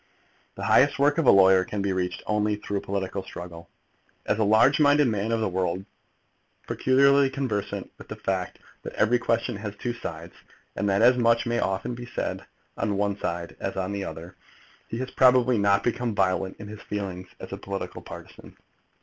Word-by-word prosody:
The - - -7
highest 140 - +4
work 145 +3 +3
of 155 - +1
a - - +9
lawyer 95 -1 +6
can 105 - -6
only 100 -1 0
be - - 0
reached 105 +3 -2
through 100 -1 -2
political 100 0 -3
struggle. 85 -3 -10 0.6
As 105 - 0
a - - +3
large 110 +7 +4
minded 145 -1 +5
man 110 0 -1
of 115 -1 0
the 110 - +1
world, 95 0 -2 0.8
peculiarly 140 +1 +4
conversant 130 -7 -3
with - - -12
the - - -6
fact 95 -1 -3 0.2
that - - -8
every 120 +3 +3
question 115 -1 -1
has 105 0 -6
two 120 +4 -3
sides, 85 -7 -7 0.4
and 100 +1 -1
that 100 +3 +2
as 125 +1 +6
much 115 -1 +3
may 120 0 0
often 95 +5 -1
be 120 +1 -8
said - - -4 0.3
on 100 -1 -1
one 100 0 0
side 85 0 -4
as 95 - -4
on 95 +1 -2
the 100 -1 -3
other, 85 -1 -8 0.5
he 115 - -5
has 130 +1 -4
probably 125 -2 +4
not 100 0 +3
become 120 -2 -1
violent 95 0 0
in 105 - -8
his 105 0 -9
feelings 95 -3 -5
as - - -9
a - - -4
political 100 0 -6
partisan. - - -12
105 Hz, 190 wpm, -26 LUFS, 95-120 Hz, 0.8 s, a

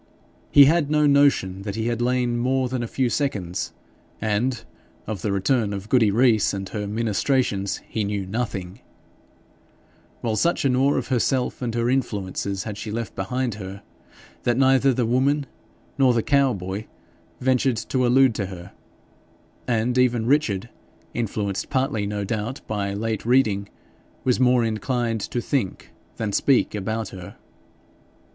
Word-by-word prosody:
He 140 - +8
had 155 0 +3
no 150 0 +3
notion 140 -10 +3
that 100 0 -5
he 110 - -2
had 120 0 -1
lain 120 -1 +1
more 130 +1 +1
than 125 0 -3
a 120 - -3
few 130 +2 0
seconds; 105 - -2 0.5
and 110 +3 -1 0.4
of 105 -4 -4
the 105 - -1
return 100 +2 +1
of 100 +1 -6
Goody 115 -4 +4
Rees 110 -2 +3
and 95 0 -4
her 105 -1 -4
ministrations 110 -1 0
he 110 - -2
knew 100 -1 -2
nothing; 100 -2 -4 1.4
while 115 -2 -1
such 170 +5 +1
an 130 -2 +3
awe 135 +3 +3
of - - -2
herself 130 +1 0
and 120 -2 -2
her 115 0 +1
influences 100 -6 -1
had 105 -2 -6
she 110 - -5
left 115 0 -4
behind 125 +5 -2
her, 95 +1 -8 0.6
that 120 -1 +1
neither 135 0 +4
the 125 -1 0
woman 135 +5 +2 0.5
nor 130 -3 +5
the 115 - +1
cow 140 -2 +3
boy 95 +2 -5 0.5
ventured 130 -1 +2
to 130 +2 -1
allude 130 0 +5
to 100 -3 -3
her, 90 -2 -9 1.0
and 120 +1 +1
even 120 -3 +2
Richard, 120 -6 +1 0.4
influenced 105 -4 -2
partly, 130 -6 0
no 105 0 -3
doubt, 110 +5 -3
by 100 -2 -2
late 110 0 -2
reading, 110 -5 +2 0.5
was 125 -2 +2
more 125 -1 +4
inclined 115 0 -1
to 120 - -3
think 120 -7 -2 0.3
than 110 -2 -2
speak 135 +4 +3
about 110 +2 -3
her. 90 -2 -10
115 Hz, 150 wpm, -23 LUFS, 100-130 Hz, 1.4 s, He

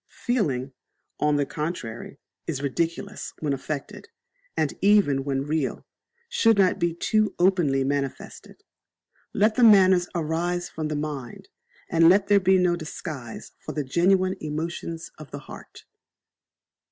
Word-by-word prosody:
Feeling, 140 - 0 0.5
on 150 0 +2
the 145 -1 +1
contrary, 140 -6 -5 0.3
is 145 -4 -3
ridiculous 170 +8 -3
when 150 -3 -1
affected, 140 +1 -6 0.5
and, - - +1
even 195 -10 +4
when 135 -1 -1
real, 150 -1 -2 0.4
should 225 - +3
not 190 -2 +3
be 170 -1 0
too 215 +4 +1
openly 175 -8 +2
manifested. 140 0 -4 0.7
Let 215 +2 +2
the 245 - +2
manners 190 -5 +6
arise 170 +2 -1
from 155 -1 -4
the 150 - -3
mind, 145 -5 -5 0.4
and 165 0 +5
let 195 +2 +3
there 205 -1 +6
be 190 0 +4
no 180 -1 +2
disguise 155 -7 -7
for - - -7
the 150 - -2
genuine 185 +6 +2
emotions 165 +2 -5
of 155 - -10
the 145 - -7
heart. 145 - -12
165 Hz, 135 wpm, -25 LUFS, 145-185 Hz, 0.7 s, manners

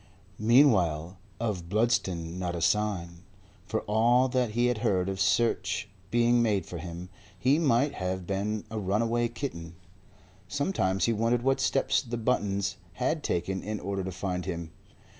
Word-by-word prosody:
Meanwhile, 95 - +3 0.2
of 100 -7 -3
Bludston 95 -6 0
not 90 -1 -2
a 85 - -4
sign. 85 -4 0 0.5
For 110 - -1
all 120 +5 +3
that 125 -3 0
he 120 +2 +2
had 125 -3 +1
heard 95 -3 +1
of 95 0 -3
search 105 +1 +1 0.2
being 120 0 +3
made 105 -4 +1
for 85 - -7
him, 85 +1 -7 0.3
he 130 - +3
might 140 -2 +2
have 95 -1 -3
been 100 +3 -2
a 110 - -2
runaway 115 +4 +1
kitten. 85 - -6 0.7
Sometimes 105 - 0
he 115 - +2
wondered 115 +2 +1
what 135 0 +2
steps 135 +1 +2
the 120 -3 -5
Buttons 100 -4 0 0.2
had 150 +5 -1
taken 95 -3 -1
in 105 0 -4
order 100 -1 -3
to 95 - -4
find 90 -1 -3
him. 85 -3 -5
105 Hz, 155 wpm, -28 LUFS, 90-120 Hz, 0.7 s, Meanwhile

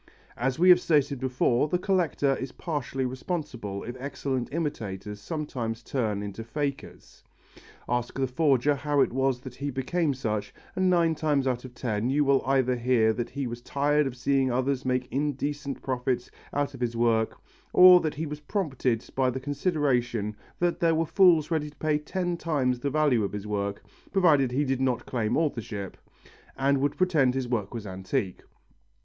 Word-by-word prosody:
As 125 +1 -1
we 180 +3 +5
have 180 0 +9
stated 145 -5 +2
before, 130 +1 +1
the 180 - +1
collector 175 -7 +1
is 130 -1 -5
partially 135 -5 -3
responsible 125 - -4
if 120 - -6
excellent 135 -2 -3
imitators 105 - -4
sometimes 120 -4 -4
turn 110 -7 -1
into 100 +2 -6
fakers. 140 +4 -5 0.6
Ask 120 +1 -2
the 135 - +1
forger 140 0 +2
how 145 0 +1
it - - +2
was 135 -1 +1
that 130 -1 -9
he 140 +3 -4
became 140 +3 -1
such, 105 -5 -3 0.2
and 185 0 +2
nine 170 -2 +3
times 150 -3 0
out 125 -1 -1
of 125 -1 -11
ten 115 -1 -1
you 145 +2 +2
will 140 -1 +3
either 130 -2 +2
hear 120 -2 +2
that 120 +1 -3
he 140 0 -4
was 120 0 -5
tired 145 +2 +1
of 130 -1 -6
seeing 135 +1 +1
others 130 +2 0
make 125 -1 0
indecent 145 0 -2
profits 125 -1 -2 0.2
out 145 0 -1
of - - -10
his 120 -1 -1
work, 115 -1 +2 0.3
or 180 0 +9
that 155 - -2
he 160 +2 -3
was 150 0 -6
prompted 140 - -1
by 130 -1 +2
the 130 +1 -3
consideration 130 - 0 0.2
that 175 -1 0
there 165 -1 +3
were 165 +1 +1
fools 170 -3 +4
ready 155 -2 0
to 150 - -20
pay 155 -1 +1
ten 175 +3 -2
times 135 -7 0
the 140 - -1
value 140 -6 +2
of 100 - -3
his 105 0 -5
work, 100 -1 -3 0.3
provided 150 -10 +4
he 140 +4 +1
did 135 -1 -1
not 130 -2 0
claim 115 -4 -1
authorship, 110 - -2 0.6
and 140 +1 +2
would 145 0 0
pretend 155 -9 +3
his 130 -2 -1
work 110 -5 -2
was 115 -3 -6
antique. 95 -1 -3
135 Hz, 180 wpm, -27 LUFS, 120-150 Hz, 0.6 s, have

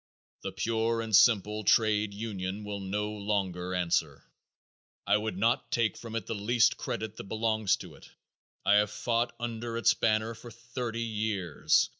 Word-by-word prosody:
The - - -4
pure 115 0 0
and 110 -2 +1
simple 105 -1 +4
trade 105 0 +3
union 100 -2 -4
will 105 -1 -4
no 105 +2 -2
longer 95 -4 -2
answer. 85 -5 0 0.8
I 100 - +4
would 105 -3 -1
not 115 +6 +1
take 115 -4 +1
from 115 -1 -8
it 115 - -2
the - - -3
least 110 +2 +3
credit 110 -2 -4
that - - -6
belongs 110 -1 +1
to - - -11
it. - - -15 0.6
I 105 - +6
have 105 0 +3
fought 120 +2 -1
under 115 -1 -4
its 115 - +4
banner 110 +1 +1
for 120 +1 -11
thirty 115 0 -5
years. 105 -7 +1
110 Hz, 160 wpm, -29 LUFS, 100-115 Hz, 0.8 s, I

